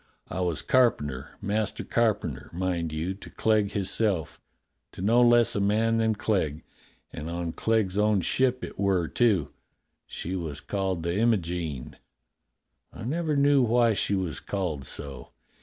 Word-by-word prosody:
I -, -, -4 dB
was 85 Hz, -4 st, -1 dB
carpenter, 75 Hz, -, +1 dB
master 105 Hz, +1 st, -1 dB
car 115 Hz, -3 st, +2 dB
penter, -, -, -7 dB
mind 85 Hz, -2 st, -2 dB
you, 80 Hz, +4 st, -2 dB
to 95 Hz, -, -12 dB
Clegg 105 Hz, -2 st, +1 dB
hisself 95 Hz, -4 st, -1 dB, 0.3 s
— -, -, -52 dB
to -, -, -8 dB
no 115 Hz, +4 st, +4 dB
less 120 Hz, -1 st, +5 dB
a 100 Hz, -, +1 dB
man 110 Hz, +3 st, +2 dB
than 110 Hz, -1 st, +2 dB
Clegg. 85 Hz, -9 st, -1 dB, 0.5 s
And 75 Hz, +3 st, -6 dB
on 85 Hz, 0 st, -3 dB
Clegg's 105 Hz, -1 st, 0 dB
own 105 Hz, -2 st, +3 dB
ship 125 Hz, +7 st, +1 dB
it -, -, -7 dB
were, 95 Hz, -4 st, +2 dB
too. 105 Hz, -, +1 dB, 0.5 s
She 90 Hz, +3 st, -5 dB
was 80 Hz, -5 st, -4 dB
called 95 Hz, -4 st, -2 dB
the 85 Hz, +1 st, -1 dB
Imogene. 85 Hz, -, -1 dB, 0.9 s
I -, -, -9 dB
never 155 Hz, +5 st, -1 dB
knew 140 Hz, 0 st, +5 dB
why 120 Hz, -1 st, +3 dB
she 100 Hz, 0 st, 0 dB
was 90 Hz, -6 st, -2 dB
called 85 Hz, -9 st, -3 dB
so. 70 Hz, -2 st, -7 dB
100 Hz, 155 wpm, -27 LUFS, 85-115 Hz, 0.9 s, less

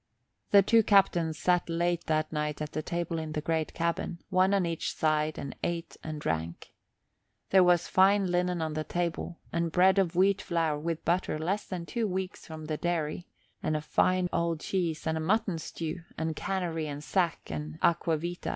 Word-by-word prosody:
The 200 Hz, -1 st, +7 dB
two 230 Hz, +3 st, +5 dB
captains 175 Hz, -6 st, +3 dB
sat 180 Hz, +1 st, +1 dB
late 170 Hz, +1 st, 0 dB
that 155 Hz, 0 st, 0 dB
night 150 Hz, -1 st, -2 dB
at 150 Hz, 0 st, -4 dB
the 155 Hz, -, -2 dB
table 170 Hz, +1 st, -2 dB
in 155 Hz, -1 st, -5 dB
the 155 Hz, -, -1 dB
great 160 Hz, 0 st, -1 dB
cabin, 170 Hz, +1 st, -1 dB
one 185 Hz, +1 st, +4 dB
on 195 Hz, -3 st, +2 dB
each 165 Hz, -1 st, -2 dB
side, 155 Hz, 0 st, +1 dB
and 140 Hz, -, -6 dB
ate 170 Hz, -1 st, -3 dB
and 155 Hz, -1 st, -5 dB
drank. 80 Hz, -, -3 dB, 0.8 s
There 190 Hz, -1 st, +7 dB
was 175 Hz, -1 st, +3 dB
fine 195 Hz, +1 st, +4 dB
linen 180 Hz, -1 st, 0 dB
on 155 Hz, -1 st, -2 dB
the 155 Hz, 0 st, -2 dB
table, 170 Hz, 0 st, -3 dB, 0.2 s
and 170 Hz, -1 st, 0 dB
bread 190 Hz, +3 st, +5 dB
of 180 Hz, -3 st, +1 dB
wheat 195 Hz, +2 st, +3 dB
flour 165 Hz, -3 st, 0 dB
with 165 Hz, +1 st, -3 dB
butter 175 Hz, -2 st, +1 dB
less 185 Hz, +7 st, -2 dB
than 180 Hz, -3 st, -4 dB
two 230 Hz, +4 st, -1 dB
weeks 185 Hz, -1 st, -4 dB
from 155 Hz, -1 st, -8 dB
the 155 Hz, 0 st, -2 dB
dairy, 170 Hz, 0 st, -2 dB, 0.3 s
and 155 Hz, 0 st, 0 dB
a -, -, -4 dB
fine 185 Hz, +4 st, +2 dB
old 170 Hz, -1 st, 0 dB
cheese, 170 Hz, -3 st, -2 dB
and 160 Hz, 0 st, 0 dB
a -, -, -3 dB
mutton 195 Hz, 0 st, +1 dB
stew, 165 Hz, +2 st, -5 dB, 0.2 s
and 160 Hz, 0 st, -2 dB
canary 170 Hz, -4 st, -2 dB
and 145 Hz, 0 st, -6 dB
sack 175 Hz, -1 st, -1 dB
and 75 Hz, 0 st, -5 dB
aqua 165 Hz, -1 st, +3 dB
vitæ. 175 Hz, +3 st, -4 dB
170 Hz, 190 wpm, -29 LUFS, 155-180 Hz, 0.8 s, The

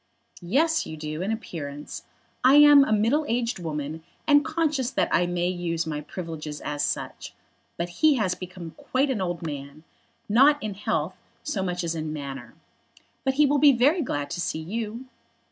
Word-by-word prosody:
"Yes, 305 Hz, -, +1 dB
you 155 Hz, -, -7 dB
do, 155 Hz, +1 st, -5 dB
in 195 Hz, +4 st, -1 dB
appearance. 150 Hz, -10 st, -6 dB, 0.4 s
I 260 Hz, +2 st, +7 dB
am 295 Hz, -1 st, +9 dB
a 245 Hz, -, -2 dB
middle 230 Hz, +9 st, +3 dB
aged 235 Hz, -2 st, -1 dB
woman, 155 Hz, -1 st, -4 dB, 0.2 s
and 290 Hz, -1 st, +5 dB
conscious 310 Hz, -5 st, 0 dB
that -, -, 0 dB
I 175 Hz, -, +3 dB
may 175 Hz, 0 st, 0 dB
use 175 Hz, -2 st, -2 dB
my 150 Hz, -2 st, -3 dB
privileges 155 Hz, -2 st, -6 dB
as 145 Hz, 0 st, -2 dB
such. -, -, -4 dB, 0.4 s
But 170 Hz, +1 st, -2 dB
he 310 Hz, -2 st, +6 dB
has 205 Hz, -7 st, +1 dB
become 180 Hz, -2 st, -8 dB
quite 270 Hz, +2 st, 0 dB
an 220 Hz, -7 st, -2 dB
old 175 Hz, -2 st, -3 dB
man, 145 Hz, 0 st, -7 dB, 0.4 s
not 270 Hz, +8 st, +5 dB
in 215 Hz, -2 st, -3 dB
health 185 Hz, -3 st, -2 dB, 0.3 s
so 195 Hz, -, -2 dB
much 180 Hz, -1 st, -2 dB
as 165 Hz, -1 st, -1 dB
in 155 Hz, -1 st, -4 dB
manner. 135 Hz, -5 st, -7 dB, 0.7 s
But 265 Hz, -1 st, 0 dB
he 300 Hz, +1 st, +5 dB
will 285 Hz, +1 st, +2 dB
be 285 Hz, -1 st, +7 dB
very 285 Hz, +8 st, +3 dB
glad 145 Hz, -, -3 dB
to 175 Hz, -, -3 dB
see 160 Hz, -, -2 dB
you." 220 Hz, +8 st, -5 dB
185 Hz, 180 wpm, -25 LUFS, 155-265 Hz, 0.7 s, am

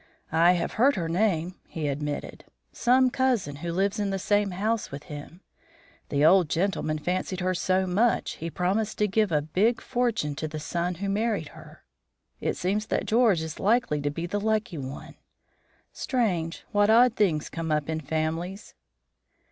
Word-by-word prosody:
"I 170 Hz, +2 st, +5 dB
have 175 Hz, -, -1 dB
heard 280 Hz, +3 st, +5 dB
her 170 Hz, -3 st, -2 dB
name," 180 Hz, -1 st, 0 dB
he 155 Hz, -3 st, -4 dB
admitted. 145 Hz, +1 st, -4 dB, 0.3 s
"Some 255 Hz, +1 st, +3 dB
cousin, 240 Hz, -, 0 dB
who 170 Hz, +3 st, -4 dB
lives 200 Hz, +4 st, 0 dB
in 205 Hz, -1 st, 0 dB
the 195 Hz, -, -1 dB
same 205 Hz, +1 st, +1 dB
house 210 Hz, +4 st, -1 dB
with 140 Hz, +1 st, -8 dB
him. 150 Hz, +4 st, -10 dB, 0.7 s
The 145 Hz, +1 st, +2 dB
old 175 Hz, -1 st, +5 dB
gentleman 165 Hz, -3 st, 0 dB
fancied 180 Hz, +3 st, -2 dB
her 185 Hz, 0 st, 0 dB
so 185 Hz, +1 st, +1 dB
much, 210 Hz, +6 st, +1 dB
he 165 Hz, -, -4 dB
promised 200 Hz, +6 st, -1 dB
to 210 Hz, -, +2 dB
give 210 Hz, -1 st, +1 dB
a 150 Hz, -2 st, +2 dB
big 200 Hz, +10 st, +1 dB
fortune 235 Hz, -, -1 dB
to 155 Hz, -, -2 dB
the 155 Hz, 0 st, -6 dB
son 175 Hz, +3 st, -2 dB
who 200 Hz, +4 st, -4 dB
married 205 Hz, -4 st, -1 dB
her. -, -, -14 dB, 0.6 s
It -, -, -2 dB
seems 205 Hz, +4 st, -1 dB
that -, -, -1 dB
George 220 Hz, -7 st, +3 dB
is 160 Hz, -1 st, -6 dB
likely 205 Hz, -8 st, +2 dB
to 145 Hz, -, 0 dB
be 165 Hz, +4 st, -4 dB
the 200 Hz, +4 st, -2 dB
lucky 215 Hz, -5 st, -1 dB
one. 135 Hz, +1 st, -8 dB, 0.8 s
Strange, 180 Hz, -10 st, -1 dB
what 205 Hz, -1 st, +3 dB
odd 235 Hz, +1 st, +6 dB
things 165 Hz, -8 st, +1 dB
come 165 Hz, -1 st, -4 dB
up 150 Hz, -1 st, 0 dB
in 160 Hz, 0 st, -2 dB
families." 160 Hz, +6 st, -3 dB
185 Hz, 170 wpm, -26 LUFS, 160-210 Hz, 0.8 s, odd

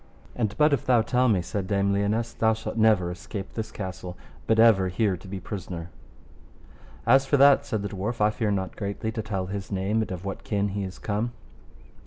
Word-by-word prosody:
And 110 Hz, -3 st, -1 dB
but 150 Hz, 0 st, +4 dB
if 135 Hz, -, +1 dB
thou 120 Hz, -3 st, +4 dB
tell 125 Hz, +2 st, +2 dB
me, 95 Hz, -5 st, +2 dB
said 95 Hz, +2 st, -3 dB
Dame 100 Hz, 0 st, +1 dB
Lionesse, 105 Hz, +4 st, 0 dB
thou 110 Hz, 0 st, +2 dB
shalt 110 Hz, -, -6 dB
never 110 Hz, -6 st, +3 dB
escape 95 Hz, +3 st, -7 dB
this 110 Hz, -1 st, -4 dB
castle, 95 Hz, -3 st, -6 dB, 0.3 s
but 110 Hz, -, +3 dB
ever 110 Hz, -5 st, +6 dB
here 95 Hz, +1 st, +1 dB
to 90 Hz, -, -12 dB
be 95 Hz, 0 st, -5 dB
prisoner. 90 Hz, -2 st, -6 dB, 1.1 s
As 135 Hz, +3 st, +5 dB
for 145 Hz, -, +3 dB
that, 140 Hz, 0 st, +6 dB
said 110 Hz, -2 st, -2 dB
the 100 Hz, -, -3 dB
dwarf, 105 Hz, +4 st, -4 dB
I 105 Hz, 0 st, +4 dB
fear 110 Hz, 0 st, -1 dB
not 95 Hz, -2 st, -2 dB
greatly 100 Hz, +2 st, -3 dB
to 110 Hz, -, -3 dB
tell 100 Hz, -3 st, -3 dB
his 100 Hz, +1 st, -6 dB
name 100 Hz, +3 st, 0 dB
and 110 Hz, -, -3 dB
of 90 Hz, +1 st, -6 dB
what 95 Hz, -, -5 dB
kin 100 Hz, -1 st, 0 dB
he 100 Hz, +1 st, -3 dB
is 95 Hz, -1 st, -6 dB
come. 110 Hz, +3 st, -2 dB
105 Hz, 210 wpm, -26 LUFS, 95-110 Hz, 1.1 s, ever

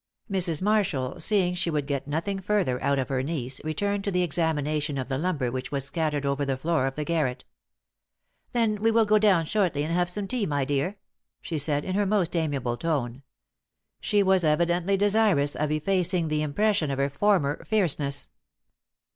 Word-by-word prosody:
Mrs. 180 Hz, -4 st, +1 dB
Marshall, 190 Hz, -12 st, 0 dB
seeing 190 Hz, -4 st, +2 dB
she 175 Hz, -1 st, -1 dB
would 150 Hz, -3 st, -1 dB
get 140 Hz, -1 st, -3 dB
nothing 170 Hz, +7 st, -2 dB
further 185 Hz, -11 st, 0 dB
out 140 Hz, +1 st, +1 dB
of 130 Hz, -, -2 dB
her 130 Hz, -2 st, 0 dB
niece, 135 Hz, -3 st, -3 dB
returned 200 Hz, +6 st, -1 dB
to 200 Hz, -, -1 dB
the 180 Hz, -2 st, +1 dB
examination 150 Hz, -3 st, -1 dB
of 130 Hz, 0 st, -4 dB
the 135 Hz, -, -1 dB
lumber 150 Hz, -8 st, -1 dB
which 130 Hz, +2 st, -5 dB
was 140 Hz, -2 st, -1 dB
scattered 150 Hz, -1 st, -2 dB
over 140 Hz, +1 st, 0 dB
the 135 Hz, -1 st, -1 dB
floor 145 Hz, -1 st, 0 dB
of 135 Hz, -, -4 dB
the 150 Hz, -, -2 dB
garret. 150 Hz, -6 st, -1 dB, 1.1 s
"Then 220 Hz, -4 st, 0 dB
we 225 Hz, -, +3 dB
will 225 Hz, 0 st, +3 dB
go 215 Hz, 0 st, +4 dB
down 195 Hz, -6 st, +3 dB
shortly 175 Hz, -6 st, 0 dB
and 160 Hz, +2 st, -2 dB
have 175 Hz, 0 st, +1 dB
some 195 Hz, +2 st, -3 dB
tea, 230 Hz, -2 st, -1 dB
my 145 Hz, -3 st, 0 dB
dear," 145 Hz, +8 st, -1 dB, 0.4 s
she 160 Hz, -3 st, -4 dB
said, 145 Hz, 0 st, +1 dB
in 185 Hz, -, -3 dB
her 200 Hz, +1 st, +1 dB
most 190 Hz, -4 st, +1 dB
amiable 140 Hz, -7 st, -1 dB
tone. 135 Hz, -4 st, -2 dB, 0.8 s
She 205 Hz, -1 st, +2 dB
was 190 Hz, -2 st, +3 dB
evidently 175 Hz, +4 st, +2 dB
desirous 200 Hz, -8 st, +2 dB
of 150 Hz, 0 st, -1 dB
effacing 175 Hz, +1 st, +1 dB
the 150 Hz, 0 st, 0 dB
impression 155 Hz, +2 st, +1 dB
of 135 Hz, -, -2 dB
her 140 Hz, 0 st, 0 dB
former 150 Hz, -3 st, +1 dB
fierceness. 150 Hz, -10 st, 0 dB
160 Hz, 185 wpm, -26 LUFS, 140-195 Hz, 1.1 s, go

